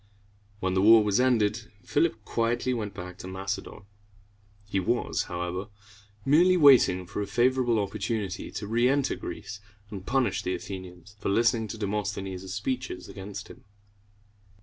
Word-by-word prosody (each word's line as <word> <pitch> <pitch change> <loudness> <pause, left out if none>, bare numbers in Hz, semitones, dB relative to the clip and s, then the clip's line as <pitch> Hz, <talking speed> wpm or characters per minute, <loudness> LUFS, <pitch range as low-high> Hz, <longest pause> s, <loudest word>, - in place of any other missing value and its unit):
When 95 0 0
the 95 - +2
war 110 +2 +8
was 105 +2 +2
ended, 115 -3 +1
Philip 145 -8 0
quietly 120 +2 0
went 105 -4 -4
back 90 -1 -8
to 90 - -7
Macedon. 95 +2 -5 0.8
He 100 -1 -1
was, 120 +6 0
however, 90 +2 -4 0.6
merely 175 +6 +5
waiting 130 - +6
for 95 - -4
a 100 - -3
favorable 125 0 +2
opportunity 100 -1 -2
to 105 - -6
reënter 125 +5 +2
Greece, 105 - -7 0.3
and 100 -3 -6
punish 125 -3 +1
the 90 - -2
Athenians 95 0 -9
for - - -2
listening 115 +2 +2
to 110 - -6
Demosthenes' 100 -3 -3
speeches 105 0 -3
against 100 0 -8
him. - - -13
105 Hz, 140 wpm, -27 LUFS, 95-120 Hz, 0.8 s, war